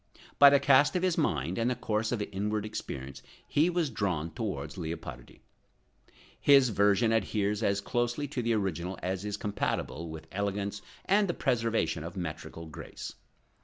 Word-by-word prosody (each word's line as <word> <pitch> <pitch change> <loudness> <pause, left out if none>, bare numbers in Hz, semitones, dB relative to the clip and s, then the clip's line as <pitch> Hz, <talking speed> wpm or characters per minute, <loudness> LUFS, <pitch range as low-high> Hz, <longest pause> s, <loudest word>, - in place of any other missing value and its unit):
By 140 - +11
the 140 0 +5
cast 140 +4 +5
of 180 - +1
his 185 -2 +2
mind 85 - 0
and 115 +2 +2
the 125 - 0
course 110 -2 -1
of 120 -4 -1
his - - -3
inward 105 +2 -1
experience 65 -10 -6 0.3
he 155 +4 +3
was 170 -5 0
drawn 90 -7 -1
towards 80 - -4
Leopardi. 80 -8 -7 1.0
His 135 -3 +6
version 105 +2 +3
adheres 105 -1 0
as 100 -2 +1
closely 120 +5 -1
to 135 -3 -2
the 115 0 +1
original 95 -3 -2
as 95 +1 -2
is 105 0 -3
compatible 85 -5 -2
with 80 0 -8
elegance 100 +1 -2 0.2
and 200 +1 +3
the 175 - -1
preservation 115 - 0
of 85 +3 -7
metrical 80 -1 -6
grace. 80 - -8
105 Hz, 165 wpm, -30 LUFS, 85-120 Hz, 1.0 s, By